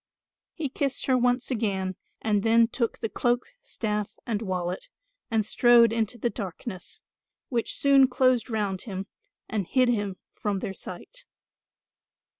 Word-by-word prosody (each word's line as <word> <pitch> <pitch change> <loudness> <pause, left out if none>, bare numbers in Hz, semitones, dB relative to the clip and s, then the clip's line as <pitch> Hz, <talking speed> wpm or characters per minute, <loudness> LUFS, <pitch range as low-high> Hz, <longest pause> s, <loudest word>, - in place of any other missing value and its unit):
He 320 -4 -2
kissed 275 0 -1
her 260 - +3
once 250 +1 +1
again 195 -5 -1 0.3
and 210 -2 +2
then 230 +2 +5
took 235 -1 -1
the - - -2
cloak, 240 +3 +1 0.2
staff 210 -2 -2 0.2
and 225 -3 -1
wallet 185 - -3 0.4
and 220 -2 +1
strode 235 0 +6
into 230 +1 0
the 235 +1 -1
darkness; 190 -1 -6 0.5
which 235 -3 -1
soon 275 -1 +6
closed 255 -2 +2
round 205 -4 -1
him 190 0 -4 0.4
and 205 -5 -2
hid 255 -2 +3
him 205 -5 -1 0.2
from 205 -2 -2
their 190 0 -4
sight. 475 - -9
225 Hz, 140 wpm, -27 LUFS, 200-250 Hz, 0.5 s, strode